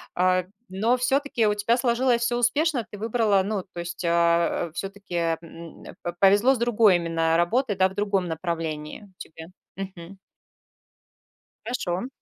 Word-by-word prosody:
а, 185 0 +2 0.2
но 220 +7 +1
всё-таки 255 -2 +1
у 210 - +2
тебя 210 +3 +1
сложилось 240 0 +1
всё 240 +1 0
успешно. 255 +1 +1
Ты 205 - -9
выбрала, 220 -3 +2
ну, 200 -1 -2
то - - -7
есть 170 +1 -6
а, 170 0 +2
всё-таки, 195 -1 -6 0.3
м, 165 0 -12 0.2
п 175 - -3
повезло 205 +7 +5
с - - -4
другой 225 -5 +4
именно 165 -1 0
работой, 205 +6 +1
да, 190 0 +3
в 190 - -13
другом 200 -3 0
направлении 165 +2 -5
тебе. 160 0 -10 0.3
Мгм. 190 -1 -8 1.5
Хорошо. 205 -3 -3
195 Hz, 140 wpm, -25 LUFS, 170-235 Hz, 1.5 s, повезло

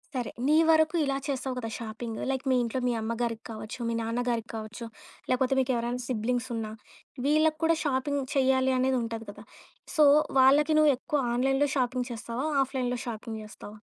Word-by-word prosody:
సరే. 245 -3 -2 0.2
నీ 305 - +4
వరకు 315 +1 +4
ఇలా 275 -1 0
చేస్తావు 265 -2 -2
కదా 225 -2 -4
షాపింగు. 225 0 -6
లైక్ 265 -1 -2
మీ - - +4
ఇంట్లో 235 +2 -2
మీ 245 - +1
అమ్మగారికి 230 +1 -2
కావచ్చు 215 +2 -7
మీ - - -1
నాన్నగారికి 235 0 -2
కావచ్చు 220 +2 -6 0.4
లేకపోతే 255 +1 +2
మీకు 260 0 +1
ఎవరైనా 240 +1 -2
సిబ్లింగ్స్ 245 +1 -1
ఉన్నా 220 -1 -4 0.5
వీళ్ళకి 310 +1 +3
కూడా 330 0 +4
షాపింగ్ 285 0 0
చేయాలి 260 -1 +3
అనేది 260 0 +2
ఉంటది 225 0 -5
కదా! 210 +1 -10 0.5
సో, 310 - +5 0.4
వాళ్ళకి 290 +4 +5
నువ్వెక్కువ 295 -1 +2
ఆన్‌లైన్‌లో 270 +3 +2
షాపింగ్ 250 -1 0
చేస్తావా? 235 +4 -4 0.2
ఆఫ్‌లై‌న్‌లో 255 -2 -2
షాపింగ్ 225 -1 -5
చేస్తావా? 215 0 -11
250 Hz, 160 wpm, -28 LUFS, 230-270 Hz, 0.5 s, సో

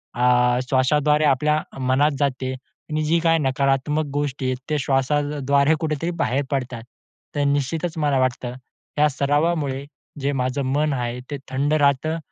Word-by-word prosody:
अ, 125 0 +3
श्वासाद्वारे 150 +3 +3
आपल्या 150 +2 +2 0.2
मनात 130 +4 +2
जाते 130 -2 -1
आणि 155 +4 -6
जी 165 +2 +2
काही 165 -1 +3
नकारात्मक 135 +2 +1
गोष्टी 140 -2 -2
आहेत 130 0 0
त्या 155 - +1
श्वासाद्वारे 140 +2 +1
कुठेतरी 160 +2 -1
बाहेर 135 +3 0
पडतात. 125 -4 -3 0.5
तर 145 - +1
निश्चितच 155 +4 -1
मला 145 -3 +2
वाटतं 125 -1 -1 0.5
या 150 - +6
सरावामुळे 145 0 0 0.4
जे 140 +1 0
माझं 130 +1 -1
मन 150 0 +1
आहे 120 -1 -3
ते 145 - -2
थंड 140 +3 0
राहतं 150 +2 +2
140 Hz, 140 wpm, -22 LUFS, 130-150 Hz, 0.5 s, या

